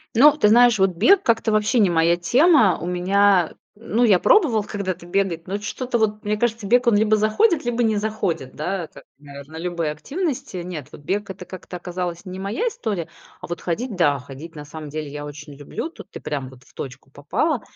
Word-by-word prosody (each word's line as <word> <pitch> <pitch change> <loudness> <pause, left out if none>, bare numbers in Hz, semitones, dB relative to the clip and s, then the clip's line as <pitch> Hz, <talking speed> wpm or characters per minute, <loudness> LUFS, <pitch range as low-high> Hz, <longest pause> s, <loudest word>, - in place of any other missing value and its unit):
Ну, 285 +6 +7
ты 210 - +4
знаешь, 235 0 +5
вот 190 0 +4
бег 370 - +5
как-то 225 -1 +2
вообще 215 +3 +2
не 200 -4 +4
моя 170 +1 +3
тема. 240 - +4
У 170 - -4
меня, 185 0 +3 0.2
ну, 230 +2 -1
я 210 -6 +6
пробовал 300 - +4
когда-то 190 -4 -4
бегать, 175 -2 -1
но 200 +2 -3
что-то 240 +4 -3
вот, 210 -1 0
мне 210 +1 +1
кажется, 230 0 -1
бег, 245 +4 +3
он 235 - +5
либо 215 +1 +3
заходит, 285 - +2
либо 240 -1 0
не 220 -1 +2
заходит, 205 -11 -2
да, 175 +2 -3
как, - - -15 0.2
наверно, 140 +2 -11
любые 170 -2 -2
активности. 280 - -4
Нет, 175 -5 -6
вот - - -12
бег- 200 +7 -2
это 190 -1 -8
как-то 180 0 -8
оказалась 175 0 -5
не 185 0 -7
моя 210 - -2
история, 210 - -3 0.3
а - - -8
вот 175 -1 -5
ходить- 215 +6 -3
да, 145 -6 +3
ходить 140 +5 -11
на 150 -1 -8
самом 155 0 -8
деле 155 0 -5
я 145 0 -6
очень 145 0 -9
люблю. 145 - -6
Тут - - -13
ты - - -9
прям 140 -3 -4
вот 130 -1 -16
в - - -24
точку 135 0 -8
попала. 215 - -1
195 Hz, 205 wpm, -22 LUFS, 165-225 Hz, 0.3 s, Ну